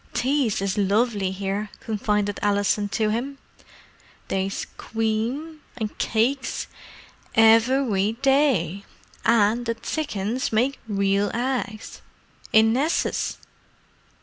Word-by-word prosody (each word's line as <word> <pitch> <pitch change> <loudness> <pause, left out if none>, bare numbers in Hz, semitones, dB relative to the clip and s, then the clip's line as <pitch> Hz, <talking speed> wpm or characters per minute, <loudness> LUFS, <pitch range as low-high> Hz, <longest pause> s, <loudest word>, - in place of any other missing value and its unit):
"Tea's 255 -6 +1
is 195 +1 -1
lovely 205 0 +1
here," 195 +2 -3
confided 210 -2 -1
Alison 205 0 +1
to 215 +1 0
him. 265 +5 -3 0.9
"They's 195 0 -2
cweam—an' 230 +3 -3
cakes, 255 +5 0 0.7
evewy 225 -1 +4
day. 260 - +2 0.4
An' 230 +1 +3
the 230 0 -1
tsickens 230 -3 -2
make 250 +5 +1
weal 200 -1 +1
eggs, 240 -3 -3 0.5
in 220 +1 +5
nesses!" 290 +7 0
220 Hz, 90 wpm, -24 LUFS, 205-250 Hz, 0.9 s, in